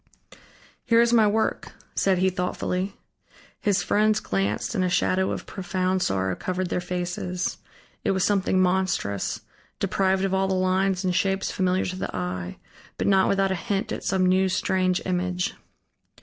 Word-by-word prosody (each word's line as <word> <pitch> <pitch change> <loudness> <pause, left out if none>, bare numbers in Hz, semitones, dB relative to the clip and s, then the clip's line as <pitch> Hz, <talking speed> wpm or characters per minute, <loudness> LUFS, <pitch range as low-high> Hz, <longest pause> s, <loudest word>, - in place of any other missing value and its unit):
"Here 230 0 +4
is 235 0 +4
my 220 -2 +6
work," 220 +2 -1 0.2
said 190 -2 +2
he 190 +1 +2
thoughtfully. 180 +1 -2 0.6
His 195 -3 +1
friends 215 +3 +2
glanced 100 - -1
and 190 -5 +1
a 180 - +1
shadow 190 +1 +1
of - - -4
profound 185 -1 -1
sorrow 95 - 0
covered 185 -1 -3
their 180 - -1
faces. 180 0 -3 0.4
It - - 0
was 190 -1 +1
something 190 -2 +2
monstrous, 185 - 0 0.4
deprived 190 0 +1
of 195 - -1
all 190 0 +2
the 190 - 0
lines 185 +1 +1
and 180 - +1
shapes 195 +1 0
familiar 185 0 +1
to 185 - -3
the - - -4
eye, 90 0 -4 0.4
but - - -1
not 190 -1 +4
without 195 -1 +2
a - - +2
hint 195 +2 -2
at - - -4
some 190 -1 +1
new, 185 +1 +3
strange 185 0 +1
image. 180 0 -1
185 Hz, 165 wpm, -25 LUFS, 180-195 Hz, 0.6 s, my